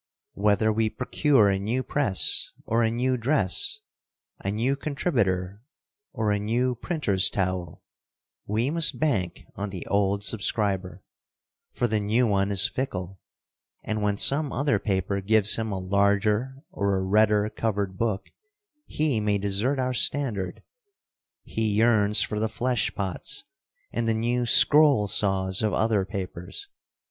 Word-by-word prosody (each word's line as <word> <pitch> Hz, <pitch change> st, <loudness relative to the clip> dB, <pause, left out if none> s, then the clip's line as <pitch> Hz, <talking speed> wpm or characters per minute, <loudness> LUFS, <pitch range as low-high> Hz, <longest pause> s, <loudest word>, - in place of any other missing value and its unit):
Whether 105 Hz, +2 st, +1 dB
we 110 Hz, 0 st, 0 dB
procure 125 Hz, +1 st, +2 dB
a 95 Hz, -1 st, 0 dB
new 115 Hz, +6 st, -2 dB
press 120 Hz, -11 st, 0 dB
or 115 Hz, +1 st, +1 dB
a 115 Hz, -, +2 dB
new 125 Hz, +3 st, 0 dB
dress, 120 Hz, -5 st, +1 dB, 0.6 s
a 100 Hz, -, -2 dB
new 115 Hz, +7 st, 0 dB
contributor 100 Hz, -, -2 dB, 0.5 s
or 105 Hz, -2 st, -1 dB
a 105 Hz, -, 0 dB
new 120 Hz, +5 st, 0 dB
printers' 120 Hz, -, 0 dB
towel, 90 Hz, -4 st, -3 dB, 0.6 s
we 115 Hz, +6 st, 0 dB
must 165 Hz, 0 st, +3 dB
bank 105 Hz, -, -1 dB
on 100 Hz, +1 st, -4 dB
the 95 Hz, -3 st, -7 dB
old 100 Hz, 0 st, 0 dB
subscriber; 100 Hz, -3 st, -1 dB, 0.7 s
for -, -, -1 dB
the 110 Hz, -2 st, 0 dB
new 110 Hz, +5 st, +1 dB
one 100 Hz, -2 st, +1 dB
is 100 Hz, +1 st, +4 dB
fickle, 95 Hz, -8 st, -5 dB, 0.6 s
and 110 Hz, -1 st, -3 dB
when 105 Hz, -1 st, 0 dB
some 140 Hz, +5 st, +2 dB
other 140 Hz, +4 st, 0 dB
paper 100 Hz, -1 st, -2 dB
gives 105 Hz, +1 st, +4 dB
him 110 Hz, -1 st, -3 dB
a 95 Hz, -, -3 dB
larger 100 Hz, +7 st, 0 dB
or 100 Hz, -1 st, -1 dB
a 95 Hz, -, -2 dB
redder 105 Hz, +1 st, +3 dB
covered 100 Hz, -4 st, -2 dB
book, 110 Hz, -4 st, -2 dB, 0.6 s
he 150 Hz, -7 st, 0 dB
may 105 Hz, -1 st, 0 dB
desert 100 Hz, +7 st, -1 dB
our 130 Hz, -1 st, -1 dB
standard. 115 Hz, -8 st, -1 dB, 0.8 s
He 110 Hz, -2 st, -2 dB
yearns 105 Hz, -2 st, +3 dB
for 105 Hz, -, -3 dB
the 110 Hz, 0 st, -1 dB
flesh 120 Hz, +1 st, -1 dB
pots 95 Hz, -3 st, -2 dB, 0.5 s
and 115 Hz, 0 st, -1 dB
the 115 Hz, -, +1 dB
new 120 Hz, +2 st, -1 dB
scroll 145 Hz, -4 st, +5 dB
saws 95 Hz, -1 st, +1 dB
of 110 Hz, -1 st, 0 dB
other 110 Hz, -3 st, +1 dB
papers. 95 Hz, -, -7 dB
105 Hz, 140 wpm, -25 LUFS, 100-120 Hz, 0.8 s, scroll